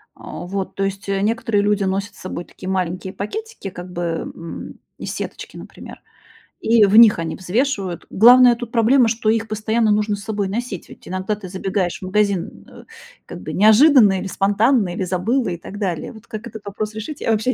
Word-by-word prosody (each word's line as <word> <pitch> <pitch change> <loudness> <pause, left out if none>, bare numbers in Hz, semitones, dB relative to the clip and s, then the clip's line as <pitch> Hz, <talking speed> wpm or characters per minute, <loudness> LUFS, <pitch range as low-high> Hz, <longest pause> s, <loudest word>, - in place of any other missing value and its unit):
А, - - -8
вот. 190 +1 -4
То 195 - -1
есть, 195 +1 -4
э, 195 0 0
некоторые 225 -1 0
люди 205 -1 +1
носят 195 +1 -2
с - - -17
собой 175 -1 -6
такие 185 - -9
маленькие 185 0 -2
пакетики 435 - -6
как 180 0 -9
бы, 175 0 -5
м, 165 0 -6 0.2
из - - -5
сеточки, - - -7
например, - - -11 0.6
и 225 -1 +4
в 200 +2 +2
них 225 -5 +8
они 165 -1 -3
взвешивают. 195 -2 -2
Главная 245 +3 +7
тут 235 -1 -8
проблема, 235 +1 +4
что 225 -1 0
их 225 0 +1
постоянно 220 +1 0
нужно 210 0 +1
с 200 - -10
собой 205 -3 -2
носить, 225 -3 -5
ведь - - -14
иногда 185 +3 -2
ты 205 -2 -10
забегаешь 190 -1 -2
в 185 - -8
магазин, 200 -1 -1
э, - - -14 0.4
как - - -9
бы - - -6
неожиданно 215 -1 +6
или 195 - -5
спонтанно, 205 +2 +2
или 190 - -3
забыла, 215 +9 0
и 175 - -4
так 205 +4 -10
далее. 180 -6 -3
Вот, 220 -1 -15
как 220 0 -7
этот 220 -2 -10
вопрос 210 +1 -4
решить, 220 +7 -7
я 230 - 0
вообще 220 +4 +1
205 Hz, 200 wpm, -20 LUFS, 190-225 Hz, 0.6 s, них